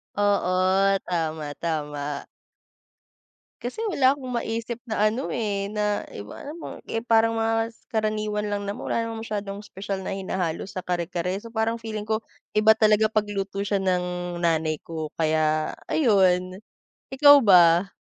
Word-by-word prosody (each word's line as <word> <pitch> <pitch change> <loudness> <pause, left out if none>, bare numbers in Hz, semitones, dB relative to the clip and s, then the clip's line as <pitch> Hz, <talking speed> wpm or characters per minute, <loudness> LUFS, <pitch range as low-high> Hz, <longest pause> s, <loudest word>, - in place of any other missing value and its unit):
Oo, 195 -1 +2
tama, 160 -3 -2
tama. 150 -3 -3 1.3
Kasi 245 - -5
wala 270 -6 +4
akong 265 -3 -8
maisip 230 0 -3
na 215 -2 +2
ano, 250 +5 -3
eh, 205 -4 -1
na 210 -1 0
iba 100 +1 -8
alam 310 +4 -8
mong - - -9
eh, 225 - -3
parang 225 -1 +3
mga 225 0 0 0.2
karaniwan 215 -1 -1
lang 205 -1 -3
naman, 200 - -5
wala 230 - 0
namang 225 -1 -5
masyadong 205 -1 -5
espesyal 195 0 -5
na - - -2
hinahalo 185 -4 -2
sa 185 -2 -6
kare-kare. 175 0 -2
So, 230 - -10
parang 225 0 -1
feeling 215 -2 -5
ko 220 0 -1 0.3
iba 220 +1 +5
talaga 215 0 +4
pag-luto 200 -2 -2
siya 200 -1 0
ng 180 -1 -1
nanay 160 -2 +1
ko 160 -2 -5
kaya 155 -1 +1 0.2
ayun, 185 - +2 0.5
ikaw 285 +1 +8
ba? 175 0 +6
200 Hz, 145 wpm, -25 LUFS, 180-225 Hz, 1.3 s, ikaw